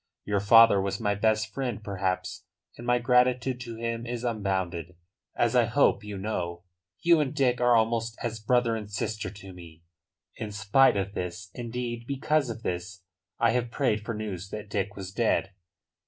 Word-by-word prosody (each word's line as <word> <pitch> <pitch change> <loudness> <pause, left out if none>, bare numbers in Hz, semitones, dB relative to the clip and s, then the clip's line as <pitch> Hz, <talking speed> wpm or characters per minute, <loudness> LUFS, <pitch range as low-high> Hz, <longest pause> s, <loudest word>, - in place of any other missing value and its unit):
Your 100 -1 +1
father 110 0 +7
was 100 0 -2
my 105 -3 +1
best 110 +1 +1
friend, 125 -6 -3
perhaps, 95 -2 -3 0.3
and 120 - -9
my 120 0 +4
gratitude 125 +1 +2
to 115 -2 -6
him 115 +1 -3
is 120 0 -4
unbounded, 95 -7 -2 0.4
as 120 +1 +1
I 120 -2 +5
hope 110 -3 +2
you 105 -1 -6
know. 90 -4 -3 0.4
You 170 -1 +5
and 150 -1 -1
Dick 125 -4 +2
are 120 0 +5
almost 115 0 +1
as 115 -1 -3
brother 120 +1 +2
and 105 -2 -6
sister 110 -1 -3
to 100 -1 -11
me. 85 -2 -13 0.5
In 105 - -5
spite 105 +4 +4
of 100 0 -2
this 90 +1 -5
indeed, 120 0 -5
because 140 0 0
of 115 0 -6
this, 90 +1 -4 0.3
I 115 - +3
have 120 -1 0
prayed 115 -5 0
for 115 0 -4
news 100 -3 -5
that 105 -1 -7
Dick 100 0 -2
was 95 -1 -7
dead." 105 -3 +1
110 Hz, 175 wpm, -27 LUFS, 100-120 Hz, 0.5 s, father